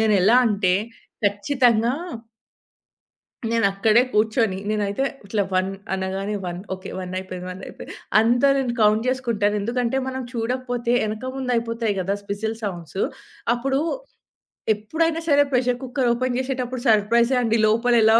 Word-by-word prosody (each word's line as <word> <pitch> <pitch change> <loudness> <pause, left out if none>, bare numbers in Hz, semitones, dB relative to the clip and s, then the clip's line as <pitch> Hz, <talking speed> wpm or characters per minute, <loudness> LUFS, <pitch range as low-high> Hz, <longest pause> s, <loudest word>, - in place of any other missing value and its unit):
నేనెలా 215 +1 +5
అంటే, 200 -4 +2 0.5
ఖచ్చితంగా 235 +3 +2 1.6
నేనక్కడే 220 0 +3
కూర్చొని, 215 -2 +2
నేనైతే 210 +3 0 0.2
ఇట్లా 205 +1 0
1 185 +1 +2 0.3
అనగానే 190 +2 -2
1 175 0 -4
ఓకే. 185 +1 -10
1 180 -1 -6
అయిపోయింది, 185 -1 -7
వన్నయిపోయింది 185 +1 -9 0.3
అంతా 240 +4 +4
నేను 255 -3 0
కౌంట్ 215 +1 +4
జేసుకుంటాను. 230 -5 0
ఎందుకంటే 240 +3 -1
మనం 260 0 -3
చూడకపోతే 245 0 -2
ఎనక 220 +5 -4
ముందు 260 -2 -3
అయిపోతాయి 230 -2 -1
గదా! 190 +2 0 0.2
విసిల్ 220 +2 -2
సౌండ్సు 180 -2 -4 0.5
అప్పుడు, 270 +3 0 0.9
ఎప్పుడైనా 320 +10 -1
సరే 290 -1 +6
ప్రెషర్ 250 -1 +2
కుక్కర్ 255 -1 0
ఓపెన్ 250 +1 -1
జేసేటప్పుడు 255 -1 -2
సర్‌ప్రైజే 230 +4 +4
అండి 225 -1 +2
లోపల 230 +3 +3
ఎలా 220 +1 +6
225 Hz, 125 wpm, -23 LUFS, 205-250 Hz, 1.6 s, సరే